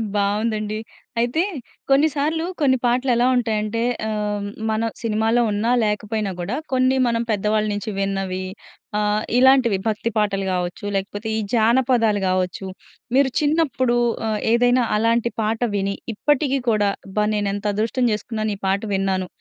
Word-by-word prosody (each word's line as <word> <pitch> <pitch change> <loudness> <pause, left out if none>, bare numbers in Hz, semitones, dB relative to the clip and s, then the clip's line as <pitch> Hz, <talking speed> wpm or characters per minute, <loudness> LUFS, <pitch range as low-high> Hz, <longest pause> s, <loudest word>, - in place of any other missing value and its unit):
బావుందండి. 210 +1 0 0.4
అయితే 245 +7 +1 0.5
కొన్నిసార్లు 300 +3 +2 0.2
కొన్ని 260 -2 +4
పాటలు 250 +2 +2
ఎలా 240 +1 +3
ఉంటాయంటే 220 -2 0 0.3
ఆహ్, 210 -1 -2 0.2
మన 220 +1 0
సినిమాలో 225 +1 +1
ఉన్నా 210 +3 0
లేకపోయినా 210 -1 -1
కూడా 185 +7 -3 0.2
కొన్ని 255 0 +3
మనం 230 0 0
పెద్దవాళ్ళ 215 +1 +1
నుంచి 205 +1 -4
విన్నవి 195 -1 -2 0.6
ఆహ్, 210 0 +1
ఇలాంటివి 255 -5 +5
భక్తి 220 +1 -1
పాటలు 200 -2 +1
గావచ్చు, 180 +2 -3
లేకపోతే 205 +3 -3
ఈ - - 0
జానపదాలు 230 -2 +3
గావచ్చు, 185 +1 -1 0.5
మీరు 270 -1 +4
చిన్నప్పుడు 290 -5 +1 0.3
ఆహ్, 215 -1 -1
ఏదైనా 245 +1 +4
అలాంటి 230 +2 +1
పాట 220 +1 0 0.2
విని 200 0 -1 0.2
ఇప్పటికి 275 +2 +1
కూడా 210 -2 +2 0.2
"అబ్బా! 210 +2 0
నేను 205 -1 0
ఎంత 205 +1 -5
అదృష్టం 230 +4 +1
చేసుకున్నాను, 215 0 -3
ఈ - - -34
పాట 195 +1 +1
విన్నాను." 190 -1 0
215 Hz, 135 wpm, -22 LUFS, 205-245 Hz, 0.6 s, ఇలాంటివి